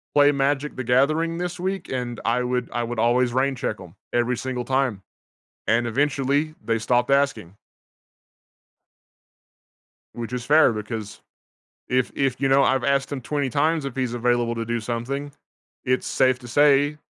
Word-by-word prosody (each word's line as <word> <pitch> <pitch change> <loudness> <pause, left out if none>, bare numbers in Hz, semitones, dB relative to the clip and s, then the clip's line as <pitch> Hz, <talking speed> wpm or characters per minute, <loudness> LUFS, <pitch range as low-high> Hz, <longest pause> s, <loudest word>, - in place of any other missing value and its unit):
play 145 0 +6
Magic 140 +1 0
The 130 - -4
Gathering 155 +7 +2
this 180 0 -4
week?" 190 0 -3
And 125 -2 -3
I 120 +2 +1
would 125 -1 -2
I 120 - -1
would 120 -1 -4
always 120 +1 +2
rain 135 +1 +1
check 110 -3 -3
'em, 90 -2 -13 0.2
every 120 0 +1
single 130 -2 -3
time, 130 -6 0 0.7
and 120 +1 +2
eventually 140 +4 0
they 115 0 0
stopped 120 +3 +1
asking. 135 -10 +1 2.6
Which 120 0 -6
is 125 -1 -3
fair, 150 -2 +5
because 105 -1 -6 0.7
if 125 0 0
if, 135 -2 -1
you 135 - +2
know, 135 +1 +5
I've 130 -2 +2
asked 140 +1 +1
him 140 -2 -4
20 140 +1 -2
times 155 +3 +1
if 135 - -5
he's 125 -3 -2
available 120 0 +1
to 115 0 -3
do 120 +1 -1
something, 125 +5 -4 0.5
it's 130 0 0
safe 130 -1 +2
to 125 - -11
say, 145 +3 +3
130 Hz, 160 wpm, -23 LUFS, 120-140 Hz, 2.6 s, play